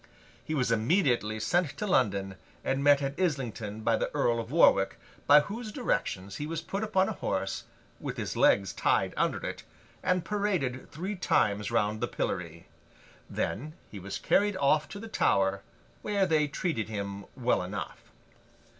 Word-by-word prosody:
He 155 - -3
was 125 -4 +1
immediately 115 - +2
sent 175 +6 0
to 210 - -2
London, 100 - +1 0.3
and 135 +1 0
met 145 0 +5
at 135 +3 -3
Islington 120 - -2
by 115 +1 +2
the - - -1
Earl 120 -1 +2
of 115 0 -5
Warwick, 100 -10 +4 0.3
by 145 +1 +8
whose 215 +6 -6
directions 100 - -2
he 150 - -4
was 165 0 -3
put 195 +6 -4
upon 190 -3 +2
a - - -1
horse, - - -2 0.3
with - - -5
his - - -3
legs - - +3
tied - - +1
under - - 0
it, - - -4 0.4
and 180 -2 +1
paraded 185 -12 -1
three 185 +7 -4
times 105 - +1
round 105 +1 0
the 120 - +1
pillory. 85 -6 -4 0.6
Then, 150 +9 -3 0.2
he 100 - -7
was 100 +2 -5
carried 205 -1 +2
off 150 +1 +3
to 200 - -7
the 225 - -7
Tower, 100 - +2 0.4
where 200 -2 +1
they 155 -4 +2
treated 145 - -2
him 100 -2 -5
well 125 -5 +2
enough. 95 +1 -6
135 Hz, 165 wpm, -29 LUFS, -, 0.6 s, by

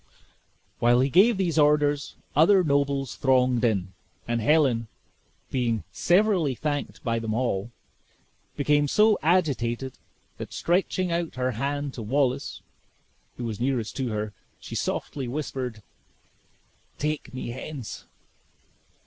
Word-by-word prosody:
While 120 +1 +4
he 135 +1 +1
gave 200 - +5
these 170 -4 +1
orders, 145 -1 +2 0.2
other 185 +6 +6
nobles 140 -3 0
thronged 125 -2 +3
in, 100 -5 0 0.3
and 120 0 0
Helen, 125 -4 +3 0.6
being 120 -4 0
severally 175 - +2
thanked 145 +1 -3
by 115 -1 0
them 110 -1 -2
all, 115 -4 -1 0.9
became 145 0 +3
so 215 +7 +4
agitated, 135 -7 0 0.4
that - - -7
stretching 180 0 0
out 170 -1 -2
her 130 0 0
hand 140 +4 -2
to 120 - -6
Wallace, 130 +4 -1 0.7
who 125 - -5
was 115 -3 -4
nearest 125 -4 -1
to 130 -2 -1
her, 105 -2 -3 0.3
she - - -10
softly 135 -3 -3
whispered, 125 -5 -4 1.1
"Take 150 0 -2
me 130 -2 -5
hence." 130 0 -7
135 Hz, 120 wpm, -26 LUFS, 120-150 Hz, 1.1 s, other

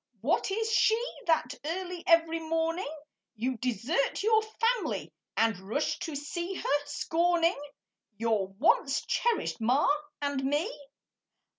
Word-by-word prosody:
What - - +1
is 445 +3 -1
she 445 0 +4 0.3
That 315 -6 +2
early 355 +2 -4
every 330 -1 +4
morning 325 +1 -1 0.5
You 250 +4 -1
desert 250 - 0
your 440 0 +4
family 455 +2 -1 0.2
And 225 -3 +2
rush 215 +11 -2
to 315 - -4
see 345 +6 -4
her, 290 -3 0
scorning 335 +2 +1 0.6
Your 220 -4 +1
once 275 - +2
cherished 470 - 0
ma 250 +6 +3 0.3
and 285 -2 -1
me? 295 - 0
320 Hz, 120 wpm, -29 LUFS, 265-355 Hz, 0.6 s, she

